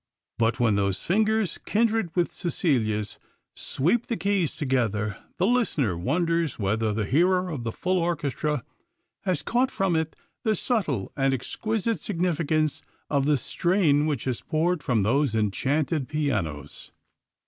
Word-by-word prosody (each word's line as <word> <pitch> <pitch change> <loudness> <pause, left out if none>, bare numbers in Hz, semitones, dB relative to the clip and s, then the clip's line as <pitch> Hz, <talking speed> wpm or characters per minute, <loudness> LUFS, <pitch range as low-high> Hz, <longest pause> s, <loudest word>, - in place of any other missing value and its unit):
But 115 0 +2
when 115 -3 +3
those 100 -1 0
fingers 215 0 +1
kindred 225 -3 +1
with 175 -1 +1
Cecilia's 110 - -1 0.3
sweep 180 - 0
the 230 - -1
keys 195 -5 0
together, 110 -7 0 0.2
the 185 - +2
listener 195 - +1
wonders 165 - 0
whether 110 +2 0
the 105 0 -1
hearer 180 - +2
of 140 -6 -4
the 115 - -2
full 185 +9 0
orchestra 150 -5 -1 0.6
has 185 -6 0
caught 250 +3 +2
from 195 -8 0
it 160 0 -1 0.3
the 220 -2 +1
subtle 170 - -1
and 135 -1 +2
exquisite 220 - -2
significance 160 -5 0 0.3
of 140 -1 +2
the 150 -1 +4
strain 155 - +2
which 145 -7 -1
has 130 -3 -2
poured 165 +1 0
from 115 -7 +1
those 130 +3 +2
enchanted 135 - 0
pianos. 100 - -2
150 Hz, 135 wpm, -26 LUFS, 120-180 Hz, 0.6 s, the